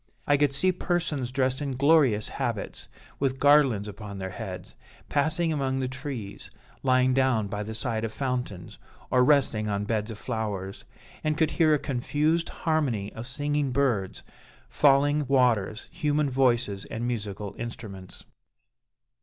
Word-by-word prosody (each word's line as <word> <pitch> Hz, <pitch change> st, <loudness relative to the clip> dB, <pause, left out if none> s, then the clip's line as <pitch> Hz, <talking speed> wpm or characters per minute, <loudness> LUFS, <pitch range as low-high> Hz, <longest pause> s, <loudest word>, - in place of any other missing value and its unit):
I 145 Hz, -, +4 dB
could 145 Hz, -1 st, +2 dB
see 175 Hz, +7 st, +2 dB
persons 165 Hz, -8 st, -2 dB
dressed 130 Hz, +1 st, 0 dB
in 140 Hz, -2 st, -2 dB
glorious 140 Hz, -6 st, +4 dB
habits -, -, -4 dB, 0.3 s
with 135 Hz, -1 st, 0 dB
garlands 140 Hz, -8 st, +4 dB
upon 105 Hz, -1 st, -8 dB
their 95 Hz, -1 st, -5 dB
heads, 95 Hz, -4 st, -7 dB, 0.4 s
passing 160 Hz, +3 st, +1 dB
among 135 Hz, -3 st, -1 dB
the 130 Hz, -1 st, -1 dB
trees, 130 Hz, -6 st, -6 dB, 0.3 s
lying 130 Hz, 0 st, +3 dB
down 130 Hz, -5 st, +2 dB
by 105 Hz, +1 st, -4 dB
the 110 Hz, +1 st, -4 dB
side 115 Hz, -1 st, -1 dB
of 115 Hz, -, -2 dB
fountains, 125 Hz, -9 st, -4 dB, 0.3 s
or 125 Hz, 0 st, +5 dB
resting 125 Hz, -6 st, +3 dB
on 100 Hz, 0 st, -1 dB
beds 110 Hz, 0 st, -1 dB
of 110 Hz, -, -6 dB
flowers; 100 Hz, -4 st, -4 dB, 0.4 s
and 155 Hz, 0 st, 0 dB
could 155 Hz, -1 st, +2 dB
hear 155 Hz, -3 st, +4 dB
a -, -, +2 dB
confused 145 Hz, +5 st, 0 dB
harmony 135 Hz, -11 st, -1 dB
of 115 Hz, +1 st, -6 dB
singing 145 Hz, +1 st, 0 dB
birds, 120 Hz, -8 st, 0 dB, 0.5 s
falling 145 Hz, -, +3 dB
waters, 120 Hz, -5 st, +2 dB
human 150 Hz, -4 st, 0 dB
voices, 120 Hz, -6 st, +1 dB
and 115 Hz, +2 st, -4 dB
musical 105 Hz, -4 st, -4 dB
instruments. 105 Hz, -5 st, -8 dB
130 Hz, 145 wpm, -27 LUFS, 110-145 Hz, 0.5 s, or